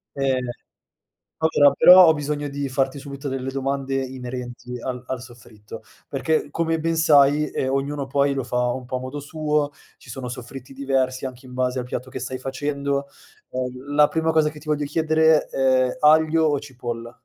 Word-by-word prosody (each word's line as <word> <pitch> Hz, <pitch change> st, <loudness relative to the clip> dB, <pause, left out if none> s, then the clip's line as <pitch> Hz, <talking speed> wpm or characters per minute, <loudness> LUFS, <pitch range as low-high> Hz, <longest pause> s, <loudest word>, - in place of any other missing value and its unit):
Ehm, 130 Hz, -2 st, 0 dB, 0.9 s
allora, 145 Hz, -3 st, +4 dB
però 180 Hz, +3 st, +9 dB
ho 160 Hz, -, +6 dB
bisogno 145 Hz, -1 st, -3 dB
di 140 Hz, 0 st, -3 dB
farti 135 Hz, +1 st, -1 dB
subito 140 Hz, 0 st, -7 dB
delle 135 Hz, 0 st, -3 dB
domande 135 Hz, 0 st, -2 dB
inerenti 125 Hz, -2 st, -5 dB
al 125 Hz, 0 st, -5 dB
al 130 Hz, -2 st, -4 dB
soffritto, 115 Hz, -3 st, -12 dB, 0.2 s
perché 150 Hz, +2 st, -1 dB
come 165 Hz, +1 st, 0 dB
ben 165 Hz, +1 st, 0 dB
sai, 150 Hz, -2 st, +4 dB
ehm, 130 Hz, 0 st, -2 dB
ognuno 140 Hz, +1 st, -2 dB
poi 140 Hz, +1 st, +1 dB
lo 135 Hz, -3 st, -2 dB
fa 125 Hz, 0 st, 0 dB
un 130 Hz, 0 st, -6 dB
po' 125 Hz, +1 st, -4 dB
a -, -, -4 dB
modo 130 Hz, +3 st, -6 dB
suo. 150 Hz, 0 st, -1 dB, 0.3 s
Ci 120 Hz, -, -15 dB
sono 125 Hz, 0 st, -6 dB
soffritti 125 Hz, +2 st, -9 dB
diversi 130 Hz, -1 st, -1 dB
anche 130 Hz, 0 st, -10 dB
in 125 Hz, -, -11 dB
base 130 Hz, 0 st, -1 dB
al 125 Hz, -, -4 dB
piatto 125 Hz, +1 st, -5 dB
che 130 Hz, -, -5 dB
stai 130 Hz, +1 st, -5 dB
facendo. 140 Hz, +1 st, -2 dB, 0.4 s
Ehm, 130 Hz, +2 st, -5 dB
la 150 Hz, 0 st, +6 dB
prima 160 Hz, 0 st, 0 dB
cosa 155 Hz, -1 st, +3 dB
che 150 Hz, -, -12 dB
ti 150 Hz, -, -16 dB
voglio 150 Hz, -1 st, 0 dB
chiedere 160 Hz, +1 st, +3 dB
è 130 Hz, -1 st, +1 dB
aglio 160 Hz, +1 st, +4 dB
o 145 Hz, -2 st, +1 dB
cipolla? 120 Hz, -4 st, -6 dB
135 Hz, 180 wpm, -23 LUFS, 130-150 Hz, 0.9 s, però